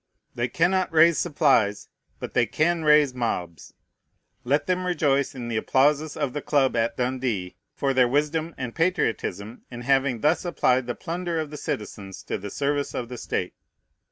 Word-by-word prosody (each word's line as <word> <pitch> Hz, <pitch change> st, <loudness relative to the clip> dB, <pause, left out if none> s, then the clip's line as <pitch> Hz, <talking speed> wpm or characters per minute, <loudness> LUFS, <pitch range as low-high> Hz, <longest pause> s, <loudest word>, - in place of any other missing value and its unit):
They 120 Hz, +1 st, -1 dB
cannot 180 Hz, +5 st, +1 dB
raise 165 Hz, 0 st, +5 dB
supplies; 135 Hz, -11 st, +2 dB, 0.3 s
but -, -, -6 dB
they -, -, +2 dB
can 165 Hz, +1 st, +1 dB
raise 150 Hz, -3 st, +5 dB
mobs. 90 Hz, -, -4 dB, 0.7 s
Let 145 Hz, +3 st, +1 dB
them 185 Hz, 0 st, -1 dB
rejoice 140 Hz, -6 st, +1 dB
in 120 Hz, -2 st, -6 dB
the 115 Hz, -2 st, -2 dB
applauses 145 Hz, +6 st, +2 dB
of 145 Hz, -4 st, -2 dB
the 145 Hz, -, -3 dB
club 135 Hz, -4 st, +2 dB
at 115 Hz, 0 st, 0 dB
Dundee 125 Hz, -7 st, -2 dB, 0.2 s
for 135 Hz, -1 st, 0 dB
their 130 Hz, -1 st, +4 dB
wisdom 150 Hz, +5 st, -1 dB
and 125 Hz, -3 st, -5 dB
patriotism 115 Hz, -, -1 dB
in 120 Hz, -1 st, -8 dB
having 135 Hz, -2 st, +1 dB
thus 155 Hz, +3 st, +2 dB
applied 130 Hz, -8 st, +1 dB
the 120 Hz, -, -3 dB
plunder 170 Hz, -1 st, -3 dB
of 155 Hz, -2 st, -4 dB
the -, -, -7 dB
citizens 100 Hz, -5 st, -6 dB
to -, -, -4 dB
the 100 Hz, +2 st, -6 dB
service 145 Hz, +4 st, -2 dB
of 120 Hz, -2 st, -4 dB
the 125 Hz, -, -7 dB
state. 90 Hz, -, -3 dB
140 Hz, 170 wpm, -25 LUFS, 120-155 Hz, 0.7 s, raise